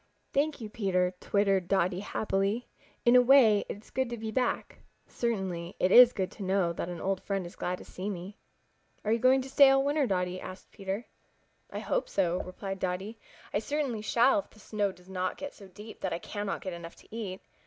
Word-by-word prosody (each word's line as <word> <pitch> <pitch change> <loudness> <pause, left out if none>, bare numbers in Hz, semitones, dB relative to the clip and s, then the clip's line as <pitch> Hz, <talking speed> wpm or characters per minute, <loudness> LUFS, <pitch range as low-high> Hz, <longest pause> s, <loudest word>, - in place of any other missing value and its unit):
"Thank 295 +2 +1
you, 225 - -5
Peter," 185 -4 0
twittered 195 -3 +1
Dotty 185 -1 +1
happily. 205 +2 -1 0.4
"In 240 +1 +6
a 250 - +9
way 245 -5 +6
it - - -4
is - - -20
good 260 -1 0
to 240 - -4
be 220 0 -4
back. 250 +3 -1 0.3
Certainly, 190 -7 -3
it 185 - +2
is 245 +2 +10
good 190 -5 -2
to - - -12
know 190 -2 +1
that 170 - -4
an 175 -2 -5
old 190 +1 -1
friend 195 -2 -2
is 175 - -10
glad 180 0 -2
to - - -12
see 190 +3 -5
me." 190 +1 -6 0.7
"Are 215 - +1
you 230 - +3
going 260 +2 +4
to - - -8
stay 280 -1 +8
all 270 0 +4
winter, 285 -1 +2
Dotty?" 180 -2 -1
asked 185 0 -9
Peter. 195 +3 -4 0.6
"I - - -6
hope - - -1
so," 180 -2 +1
replied 195 +1 -6
Dotty. 190 +5 -3 0.3
"I - - +2
certainly 270 -2 -2
shall 245 +7 +4
if 295 - -7
the 215 - -20
snow 205 -1 -1
does 180 -1 -19
not 185 -1 -2
get 285 0 -6
so 200 - -13
deep 210 +4 -12
that 190 - -1
I - - -1
cannot 205 +3 -4
get 185 - -5
enough 170 0 -8
to - - -14
eat. 195 -5 -5
200 Hz, 215 wpm, -30 LUFS, 185-235 Hz, 0.7 s, is